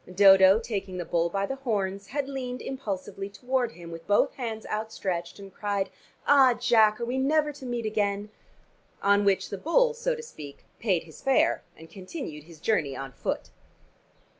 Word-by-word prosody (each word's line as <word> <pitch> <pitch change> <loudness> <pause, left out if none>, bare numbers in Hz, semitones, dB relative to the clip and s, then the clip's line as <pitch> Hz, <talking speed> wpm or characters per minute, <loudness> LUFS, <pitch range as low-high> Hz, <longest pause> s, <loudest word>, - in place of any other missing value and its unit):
Dodo, 190 +1 +7
taking 200 -5 -4
the 175 - -3
bull 170 0 +1
by 195 +2 -1
the 270 +5 -4
horns, 200 -6 -2
had 275 +5 -2
leaned 255 -2 -4
impulsively 195 -5 -5
toward 245 +2 -1
him 170 -1 -10
with 165 0 -9
both 205 - +3
hands 225 -4 -5
outstretched 190 -5 -3
and 195 -2 -11
cried, 200 -2 -2 0.3
"Ah, 270 -4 +6
Jack, 220 -3 +4
are 235 - -2
we 250 +2 -1
never 300 +2 +2
to 265 -2 -9
meet 240 -2 -2
again?" 205 -1 -1 0.7
On 200 +1 +4
which 195 -1 +2
the 200 - -4
bull, 480 - +3
so 485 +1 -1
to 465 - -8
speak, 145 - -11
paid 190 -7 +1
his 160 -1 -14
fare, 310 +5 +3 0.2
and 160 - -12
continued 185 - -8
his 165 -2 -14
journey 150 -9 0
on 135 -1 -6
foot. - - -4
205 Hz, 175 wpm, -27 LUFS, 190-255 Hz, 0.7 s, Dodo